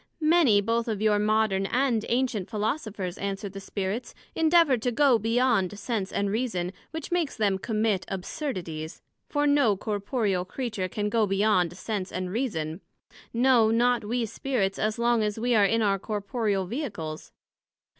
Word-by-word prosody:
Many, 305 -10 +4
both 230 +3 0
of 215 -3 -2
your 210 -1 +3
modern 210 -2 +2
and 245 -3 +1
ancient 240 -6 0
Philosophers, 210 - -3
answered 200 0 -4
the 195 - -6
Spirits, 200 +4 -4 0.2
endeavour 325 -3 +4
to 245 +2 -1
go 255 -1 +4
beyond 225 -3 +1
Sense 205 -2 -3
and 200 0 -1
Reason, 205 -6 -1 0.2
which 320 0 -6
makes 340 -7 0
them 200 -3 +1
commit 215 -3 0
absurdities; 180 - -5 0.3
for 290 -1 +1
no 285 -8 +3
corporeal 205 -2 -1
Creature 210 -1 -3
can 210 +3 -2
go 220 -1 +2
beyond 195 -3 +2
Sense 200 -4 -4
and 185 0 -3
Reason; 185 -8 -2 0.5
no 240 -2 +4
not 240 +1 +2
we 235 +3 -1
Spirits, 215 -4 -2
as 215 +1 0
long 235 -1 +2
as 210 0 -1
we 240 +2 +1
are 210 -3 +5
in 225 +3 +2
our 195 -1 +2
corporeal 205 -1 -1
Vehicles. 185 - -5
215 Hz, 155 wpm, -27 LUFS, 195-245 Hz, 0.5 s, are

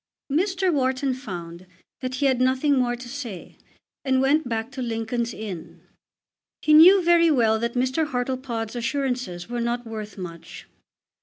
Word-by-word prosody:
Mr. 370 +3 +1
Wharton 265 -1 0
found 180 -8 -8 0.3
that 255 -1 -4
he 280 - -1
had 260 -2 +2
nothing 260 +3 +2
more 245 -2 +1
to 245 +1 -10
say, 240 -8 -7 0.5
and 260 -1 +2
went 270 +1 +2
back 225 +2 -3
to 265 -1 -6
Lincoln's 230 0 -2
Inn. 200 -7 -8 0.8
He 305 - +4
knew 360 +5 +8
very 335 -1 +5
well 225 -7 +3
that 235 +2 -2
Mr. 260 +5 +1
Hartlepod's 250 -3 -3
assurances 245 -7 -2
were 240 0 -3
not 240 +1 -2
worth 215 -2 -7
much. 170 -3 -9
250 Hz, 150 wpm, -24 LUFS, 225-275 Hz, 0.8 s, knew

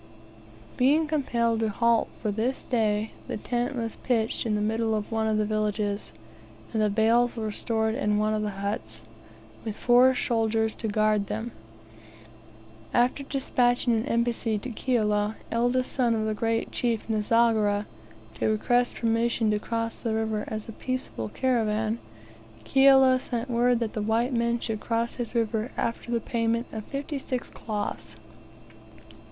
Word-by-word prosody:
Being 290 +6 +4
compelled 235 -7 0
to 220 -1 +1
halt 235 +2 +2
for 210 - +1
this 230 +6 -1
day, 215 -3 0 0.2
the - - -3
tent 245 +5 -2
was 230 -2 -4
pitched 230 -1 0
in 215 - +1
the - - 0
middle 220 +1 0
of 210 +1 -4
one 220 -1 0
of 215 -1 +1
the 215 - +1
villages, 210 -1 -1 0.6
and 220 - +1
the 210 - +3
bales 230 +3 +3
were 220 -2 -3
stored 220 +1 0
in 210 -4 +1
one 215 +1 +1
of 215 - 0
the 210 - -1 0.2
huts, 205 +1 -4 0.6
with 220 -2 -4
four 250 +3 +5
soldiers 225 -2 +1
to 225 - -4
guard 215 -1 +2
them. 220 +3 -4 1.4
After 245 +3 +3
despatching 250 -3 +1
an 225 0 0
embassy 235 -1 0
to 245 +5 -6
Kiala, 215 -3 0 0.2
eldest 245 +2 +1
son 240 -3 +2
of 215 -1 -1
the 215 - 0
great 225 +1 -1
chief 235 -3 -1
Nzogera, 215 -1 +2 0.5
to - - +1
request 245 +3 +2
permission 230 -1 +1
to 210 - +1
cross 230 +1 -3
the 225 -2 -1
river 220 -1 -1
as 215 -1 -5
a - - -6
peaceable 240 - -4
caravan, 220 - 0 0.7
Kiala 265 -1 +6
sent 245 0 -4
word 240 +1 +3
that 225 -2 -2
the 215 - -2
white 230 +4 +1
man 235 0 +1
should 220 -2 -3
cross 230 +1 -1
his 240 +1 -5
river 225 +1 0
after 230 +1 -2
the 235 -1 +1
payment 230 +1 -1
of 215 -1 -6
fifty 280 +1 -4
six 255 -2 -4
cloths! 205 - -5
225 Hz, 160 wpm, -27 LUFS, 215-240 Hz, 1.4 s, Kiala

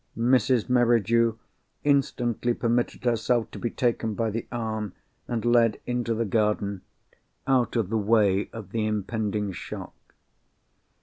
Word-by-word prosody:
Mrs. 125 0 +3
Merridew 115 -2 +3 0.5
instantly 125 -4 +1
permitted 120 +2 0
herself 120 -1 +1
to - - -8
be 120 - -1
taken 115 -3 -1
by 115 0 -1
the 115 +2 -4
arm, 110 -4 -3 0.3
and 120 -2 -2
led 120 -2 +3
into 120 -2 -1
the 115 +1 0
garden, 105 -2 0 0.6
out 130 -3 +2
of 110 -4 0
the 110 - +2
way 105 -2 +2
of 105 -4 -9
the 110 -1 -1
impending 105 -1 -2
shock. 90 - -7
115 Hz, 130 wpm, -26 LUFS, 105-120 Hz, 0.6 s, Mrs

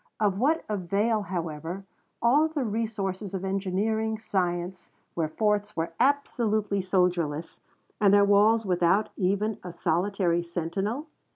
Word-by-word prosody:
Of 200 -2 +1
what 305 +7 +2
avail, 210 +3 0
however, 170 0 -5 0.4
all 285 +7 +5
the 310 -3 -2
resources 205 -3 -3
of 190 0 -3
engineering 205 +3 -1
science, 185 -4 -2 0.2
where 160 -2 -1
forts 210 +4 0
were 165 +1 -2
absolutely 220 -7 +1
soldierless, 175 -4 0 0.4
and 205 -2 +5
their 200 0 +6
walls 210 +3 +4
without 185 +3 +2
even 200 +3 0
a 180 - -6
solitary 175 +1 0
sentinel? 180 - -3
200 Hz, 120 wpm, -27 LUFS, 180-215 Hz, 0.4 s, their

